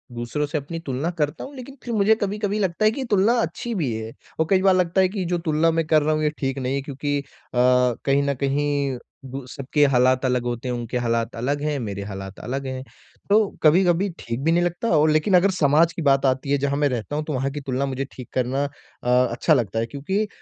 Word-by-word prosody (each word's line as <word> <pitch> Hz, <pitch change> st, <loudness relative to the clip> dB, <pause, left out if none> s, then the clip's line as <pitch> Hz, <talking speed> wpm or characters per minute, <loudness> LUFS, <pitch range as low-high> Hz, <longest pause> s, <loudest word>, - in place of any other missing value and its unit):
दूसरों 120 Hz, +6 st, -2 dB
से 150 Hz, +2 st, -3 dB
अपनी 150 Hz, +3 st, -5 dB
तुलना 135 Hz, +5 st, -2 dB
करता 150 Hz, -2 st, -1 dB
हूँ, 280 Hz, -, -9 dB
लेकिन 265 Hz, +1 st, -9 dB
फिर 240 Hz, -, -4 dB
मुझे 215 Hz, 0 st, +4 dB
कभी-कभी 205 Hz, +1 st, -1 dB
लगता 190 Hz, +2 st, 0 dB
है 215 Hz, -, +5 dB
कि 265 Hz, +4 st, -4 dB
तुलना 205 Hz, +3 st, +4 dB
अच्छी 230 Hz, +6 st, -3 dB
भी 150 Hz, -, -1 dB
है 110 Hz, 0 st, -5 dB, 0.3 s
और 160 Hz, -, +2 dB
कई 190 Hz, -1 st, +4 dB
बार 190 Hz, -1 st, +5 dB
लगता 180 Hz, +1 st, +2 dB
है 185 Hz, -, +3 dB
कि 190 Hz, -2 st, -3 dB
जो 175 Hz, 0 st, 0 dB
तुलना 155 Hz, +2 st, +3 dB
मैं 165 Hz, -1 st, 0 dB
कर 155 Hz, -1 st, +4 dB
रहा 155 Hz, +1 st, +1 dB
हूँ 155 Hz, -, -1 dB
ये 150 Hz, -, +3 dB
ठीक 135 Hz, -1 st, -2 dB
नहीं 130 Hz, +1 st, -1 dB
है 140 Hz, -, -1 dB
क्योंकि 145 Hz, +1 st, -3 dB
अ, 140 Hz, -, -8 dB, 0.3 s
कहीं 125 Hz, +2 st, +3 dB
न 140 Hz, 0 st, +1 dB
कहीं 140 Hz, -1 st, 0 dB, 0.3 s
दु 135 Hz, 0 st, -6 dB
सबके 140 Hz, +3 st, +1 dB
हालात 130 Hz, 0 st, +3 dB
अलग 125 Hz, -1 st, +1 dB
होते 120 Hz, +1 st, -3 dB
हैं, 125 Hz, -, -1 dB
उनके 120 Hz, +1 st, -3 dB
हालात 115 Hz, -1 st, -1 dB
अलग 140 Hz, +5 st, -1 dB
हैं, 150 Hz, -1 st, -1 dB
मेरे 100 Hz, -4 st, -4 dB
हालात 95 Hz, -1 st, -7 dB
अलग 135 Hz, +2 st, -4 dB
हैं। 130 Hz, 0 st, -4 dB, 0.5 s
तो 205 Hz, +2 st, +6 dB, 0.2 s
कभी-कभी 175 Hz, +4 st, +4 dB
ठीक 115 Hz, +2 st, -4 dB
भी 165 Hz, -, +3 dB
नहीं 175 Hz, +1 st, +3 dB
लगता 175 Hz, +6 st, -1 dB
और 155 Hz, +1 st, +4 dB
लेकिन 155 Hz, +6 st, +2 dB
अगर 190 Hz, +2 st, +5 dB
समाज 165 Hz, -1 st, +3 dB
की -, -, -5 dB
बात 140 Hz, -2 st, +3 dB
आती 135 Hz, +1 st, 0 dB
है, 145 Hz, -, +4 dB
जहाँ 140 Hz, 0 st, -1 dB
मैं 145 Hz, -1 st, +2 dB
रहता 125 Hz, +3 st, -3 dB
हूँ, 150 Hz, -, -1 dB
तो 150 Hz, -, -3 dB
वहाँ 135 Hz, +1 st, -1 dB
की 145 Hz, +1 st, -5 dB
तुलना 135 Hz, 0 st, -1 dB
मुझे 135 Hz, 0 st, -3 dB
ठीक 125 Hz, -, -10 dB
करना 130 Hz, +2 st, 0 dB, 0.4 s
अ, 125 Hz, +1 st, +3 dB
अच्छा 120 Hz, +7 st, +2 dB
लगता 115 Hz, -6 st, 0 dB
है 115 Hz, -, 0 dB
क्योंकि 190 Hz, -, -2 dB
145 Hz, 240 wpm, -23 LUFS, 130-170 Hz, 0.5 s, तो